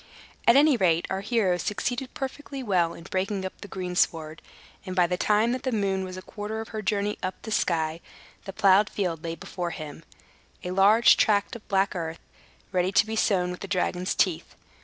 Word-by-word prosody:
At 235 - +7
any 290 -1 +6
rate, 170 -5 +2
our 190 0 -1
hero 200 -4 +1
succeeded 245 +7 -3
perfectly 270 0 -5
well 180 -6 +1
in 170 - -11
breaking 190 +2 -2
up 190 - -7
the - - -8
greensward; 175 -4 -1 0.4
and, 185 -2 -6
by 180 -2 +4
the 180 +1 -1
time 210 +5 +2
that 255 0 -2
the 260 - -2
moon 195 -4 0
was 185 0 -7
a 185 - -8
quarter 210 +1 -5
of 225 - -6
her 215 - -4
journey 210 0 -1
up 185 - -4
the 220 - -6
sky, 160 -5 0 0.5
the 195 - -5
plowed 195 +1 +4
field 175 -6 -3
lay 165 0 -3
before 175 +1 -5
him, 155 -1 -8 0.6
a 180 - -4
large 205 +5 +6
tract 205 0 +2
of 230 - -11
black 195 0 +1
earth, 165 -1 -4 0.5
ready 185 0 +1
to 200 - +4
be 220 0 -4
sown 185 -5 +1
with 180 - -7
the 195 - -6
dragon's 185 -1 -1
teeth. 180 -5 0
190 Hz, 200 wpm, -26 LUFS, 180-215 Hz, 0.6 s, At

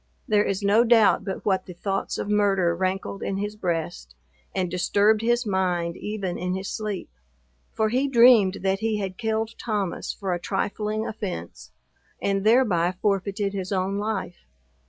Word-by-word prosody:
There 210 -3 +3
is 195 0 -2
no 205 +4 +5
doubt 225 -4 +4
but 190 - -5
what 190 -2 +1
the 180 - -8
thoughts 195 +2 -2
of - - -3
murder 195 -4 +2
rankled 190 +2 -2
in 195 - -2
his 205 +1 -3
breast, 165 - -3 0.4
and 185 -1 0
disturbed 200 +4 +2
his 240 +1 +1
mind 180 -4 0
even 200 -4 -4
in 180 +1 -2
his 190 0 -4
sleep; 210 -4 -4 0.6
for 220 -1 0
he 260 +5 +1
dreamed 235 -6 +5
that 195 0 +1
he 220 0 0
had 190 -2 -5
killed 220 0 -1
Thomas 205 -6 -2
for 195 -3 -3
a 175 - -2
trifling 210 +3 -2
offence, 190 - -6 0.5
and 195 -1 0
thereby 210 -7 +3
forfeited 200 0 0
his 190 -1 -4
own 195 +1 0
life. 205 - -4
200 Hz, 160 wpm, -25 LUFS, 185-215 Hz, 0.6 s, no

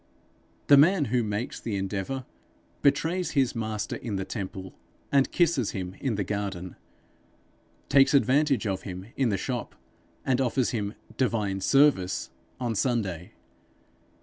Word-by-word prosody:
The 140 - +7
man 160 +2 +5
who 125 - +3
makes 105 +2 -3
the 110 -3 -3
endeavour, 100 +7 -3 0.6
betrays 160 +6 +1
his 130 -3 +3
Master 110 -2 -3
in 110 -4 -4
the 95 -1 -2
temple 95 -3 -6 0.4
and 140 -1 +3
kisses 160 - +2
him 90 -1 -4
in 130 -6 -1
the 100 - -1
garden; 95 -2 -4 1.1
takes 135 +1 +5
advantage 140 -1 +3
of 95 -2 -1
him 95 -1 -7
in 130 -3 +1
the 100 - 0
shop, - - -4 0.5
and 130 -1 +2
offers 130 0 +1
him 105 -2 -3 0.2
'divine 105 -6 0
service!' 135 -8 +3 0.3
on 120 -2 -1
Sunday. 105 -5 -1
115 Hz, 135 wpm, -27 LUFS, 95-135 Hz, 1.1 s, The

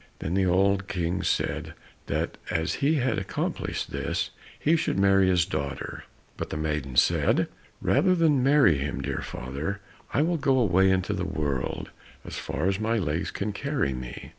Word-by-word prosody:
Then 80 - -3
the 95 0 +2
old 95 +2 +2
King 90 0 -1
said - - -1 0.3
that - - -2
as 80 0 0
he 145 +3 +3
had 130 -6 +1
accomplished 95 - -3
this, - - -2 0.3
he 160 +3 +3
should 155 - 0
marry 95 -1 +5
his 90 -3 +3
daughter. 70 -2 -4 0.3
But - - -4
the - - -3
maiden 75 -4 -2
said, - - +3 0.4
"Rather 185 -1 +4
than 155 -6 +3
marry 135 - +5
him, 70 0 -3
dear - - -3
father, 70 +11 -4 0.3
I 145 - +2
will 170 +1 +1
go 135 -3 +2
away 95 -5 +4
into 95 +2 +1
the 95 -2 -2
world 75 -8 -2 0.3
as - - -7
far - - -3
as 95 +1 +1
my 110 +1 +1
legs 85 -3 -1
can 105 +1 -3
carry 140 - -1
me." 60 -1 -7
95 Hz, 170 wpm, -27 LUFS, 80-120 Hz, 0.4 s, marry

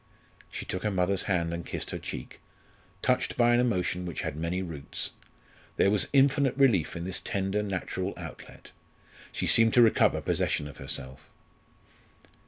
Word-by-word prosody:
She - - -6
took 90 - -3
her 105 - 0
mother's 95 0 0
hand 85 -3 0
and 85 0 -4
kissed - - -4
her - - -4
cheek, - - -7 0.6
touched 125 0 +1
by 120 0 +4
an 120 - +4
emotion 90 -6 0
which 85 - -4
had - - -3
many 85 +4 -2
roots. 80 -6 -4 0.7
There 100 - +4
was 105 - +2
infinite 140 -1 +3
relief 115 - +3
in 85 - -4
this 95 0 -3
tender 95 +2 -1
natural 95 -1 -3
outlet; - - -11 0.6
she - - -3
seemed 115 -1 +6
to 120 - +7
recover 115 - +4
possession 75 - -1
of 75 - -12
herself. 65 -1 -6
95 Hz, 160 wpm, -28 LUFS, 85-115 Hz, 0.7 s, to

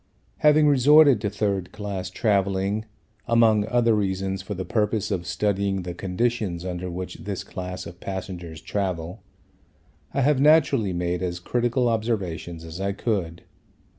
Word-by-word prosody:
Having 150 0 +5
resorted 145 -2 +6
to 105 - 0
third 100 -3 -2
class 100 -3 -5
travelling, 100 +1 0 0.4
among 110 -3 +4
other 120 0 +3
reasons, 95 -2 -1
for 100 +2 -6
the 95 0 -4
purpose 105 -1 0
of 90 -3 -2
studying 100 -2 0
the 90 0 -5
conditions 95 -1 -2
under 90 0 -4
which 90 +1 -6
this 100 -2 -5
class 90 0 -6
of 85 +1 -10
passengers 90 -4 -6
travel, 90 -3 -3 0.9
I 140 - 0
have 135 0 +3
naturally 140 -8 +4
made 90 0 -2
as 90 -1 -3
critical 120 +5 0
observations 95 -8 -2
as 80 +3 -7
I 100 0 -1
could. 95 -6 -2
100 Hz, 140 wpm, -24 LUFS, 90-115 Hz, 0.9 s, resorted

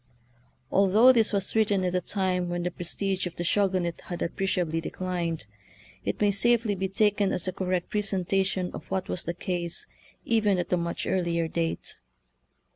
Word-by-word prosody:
Although 210 +6 +6
this 225 -3 +3
was 195 -2 +1
written 205 -3 +3
at 180 - 0
a 180 - +1
time 185 -2 0
when 175 0 -2
the 180 - -1
prestige 185 +2 -1
of 175 - -9
the 175 - -3
Shogunate 185 -2 +1
had 175 - -4
appreciably 170 -2 -1
declined, 170 -5 -3 0.6
it - - -2
may 205 -1 +3
safely 230 +1 +3
be 190 0 -2
taken 205 0 +2
as 180 - -2
a 185 - -1
correct 185 -1 -2
pre 210 - +1
sentation 190 -1 0
of - - -9
what 190 -1 -2
was 180 - -3
the 170 - -3
case 175 -1 -3 0.4
even 215 -4 +2
at 175 0 -2
a - - +4
much 170 0 -3
earlier 170 -3 0
date. 165 0 -3
185 Hz, 175 wpm, -27 LUFS, 175-200 Hz, 0.6 s, Although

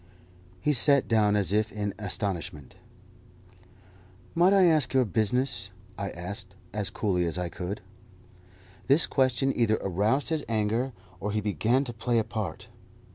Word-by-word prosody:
He 150 - +2
sat 140 +1 +5
down 105 -2 +3
as 100 -1 +1
if 110 +1 +1
in 105 -1 -3
astonishment. 95 - -4 1.6
"Might 175 +3 +4
I 195 -1 +5
ask 155 -5 +3
your 130 -1 +4
business?" 110 -1 0 0.3
I 100 -1 -4
asked 95 +2 -5 0.2
as 105 -2 0
coolly 90 -5 0
as 85 - -3
I 90 -1 -2
could. 90 +4 -5 1.1
This 140 +6 +5
question 130 0 +1
either 110 -3 +2
aroused 105 +9 0
his 160 -3 -1
anger, 115 +4 0 0.3
or 105 +3 -3
he 105 - 0
began 110 - +1
to 120 -3 -6
play 115 +1 0
a 110 - +3
part. 110 -8 -5
110 Hz, 145 wpm, -27 LUFS, 100-130 Hz, 1.6 s, sat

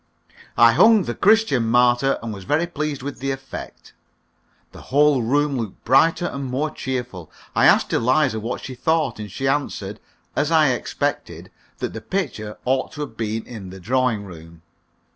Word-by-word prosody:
I 115 0 +7
hung 220 - +5
the 120 - -3
"Christian 205 - +3
Martyr," 125 +3 +3
and 115 -2 -4
was 100 -2 -9
very 150 - +1
pleased 150 -5 -4
with 145 0 -6
the 135 +2 -3
effect. 135 0 -7 0.8
The - - -12
whole 145 -1 +4
room 140 +4 +1
looked 110 -5 -7
brighter 165 +8 +4
and 140 -5 -4
more 135 +4 -2
cheerful. 125 - -5 0.3
I - - +5
asked - - +3
Eliza 130 0 +2
what 115 +3 -5
she 130 - -6
thought, 145 -1 0
and 105 -2 -7
she 135 +7 -3
answered, 145 +1 -2 0.4
as 145 +1 +1
I 160 -3 +4
expected, 125 - -3 0.3
that - - -4
the 115 - -6
picture 125 - -4
ought 130 +1 0
to 150 - -7
have 145 -6 -6
been 110 0 -3
in 105 -6 -9
the 95 +1 -10
drawing 120 0 0
room. 85 -2 -13
130 Hz, 170 wpm, -22 LUFS, 115-145 Hz, 0.8 s, I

